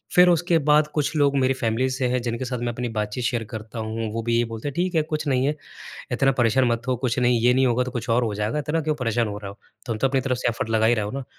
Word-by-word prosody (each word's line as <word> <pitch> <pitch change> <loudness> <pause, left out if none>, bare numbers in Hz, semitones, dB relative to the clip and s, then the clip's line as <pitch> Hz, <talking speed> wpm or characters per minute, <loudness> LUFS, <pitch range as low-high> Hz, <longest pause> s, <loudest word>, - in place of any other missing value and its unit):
फिर 180 0 +7
उसके 175 0 +3
बाद 150 0 +5
कुछ 150 +1 -1
लोग 140 -2 +3
मेरी 130 0 +2
फ़ैमिली 125 +1 0
से 130 0 -1
हैं 125 0 0
जिनके 120 +1 -3
साथ 125 -1 -3
मैं 120 - -3
अपनी 120 +1 -3
बातचीत 105 +2 -3
शेयर 120 -1 0
करता 110 0 -7
हूँ। 110 0 -3
वो 115 - -2
भी 115 0 +1
ये 120 - +2
बोलते 115 +3 -6
हैं 145 - -3
"ठीक 180 +1 -1
है 160 - +4
कुछ 155 0 -1
नहीं 130 -2 +2
है। 150 - 0 0.6
इतना 135 +2 +3
परेशान 120 +2 +3
मत 115 -1 0
हो। 130 - +1
कुछ 125 +1 -2
नहीं 120 -1 +3
ये 125 +2 +4
नहीं 130 +1 +3
होगा 125 +1 +2
तो 125 - -5
कुछ 120 -2 -5
और 120 +2 +3
हो 110 -3 -2
जाएगा 105 +7 -1
इतना 150 +2 -1
क्यों 155 0 -1
परेशान 120 -4 0
हो 105 0 -5
रहे 100 -1 -7
हो, 100 - -14 0.3
तुम 115 -3 -3
तो 135 - +2
अपनी 135 0 +1
तरफ 130 -1 -1
से - - 0
एफर्ट 115 -1 -3
लगा 110 0 +3
ही 120 - +4
रहे 110 -3 -1
हो 105 - -4
ना।" 135 +2 -5
125 Hz, 305 wpm, -23 LUFS, 115-135 Hz, 0.6 s, फिर